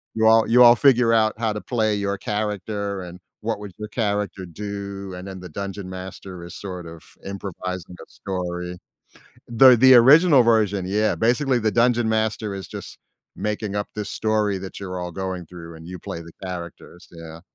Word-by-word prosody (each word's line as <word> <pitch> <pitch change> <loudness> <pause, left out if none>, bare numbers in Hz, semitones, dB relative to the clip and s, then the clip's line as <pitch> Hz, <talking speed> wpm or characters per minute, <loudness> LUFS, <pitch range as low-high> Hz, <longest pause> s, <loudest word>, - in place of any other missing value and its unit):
you 110 0 +3
all 110 0 +6
you 125 +1 +7
all 120 0 +9
figure 125 -4 +4
out 110 -1 +3
how 110 -2 0
to 105 - -5
play 110 -4 0
your 100 -1 -2
character 105 -2 -3
and 90 +1 -10 0.2
what 110 -1 -2
would 100 -2 -8
your 105 0 -6
character 105 -4 -2
do, 100 +1 -6
and 90 +2 -8
then 95 -1 -7
the 90 -1 -9
Dungeon 100 +2 -6
Master 95 -1 -8
is 85 - -10
sort 90 -3 -7
of 80 -1 -11 0.2
improvising 90 -2 -6
a - - -38
story. 90 -1 -5 0.7
The 125 +2 +7
the 130 +2 +7
original 140 +4 +7
version, 105 -5 +2
yeah, 105 +2 +1
basically 125 +2 +1
the 110 -1 0
Dungeon 120 -1 +2
Master 110 -2 -1
is 95 - -7
just - - -9 0.4
making 105 -1 -3
up 100 - -2
this 105 -1 -4
story 105 -2 0
that 95 +1 -8
you're 90 -2 -5
all 90 0 -5
going 95 -1 -4
through 85 -1 -11
and 80 0 -12
you 90 -1 -8
play 85 - -7
the 85 0 -13
characters. 90 0 -8
Yeah. 85 -1 -11
100 Hz, 185 wpm, -23 LUFS, 90-110 Hz, 0.7 s, all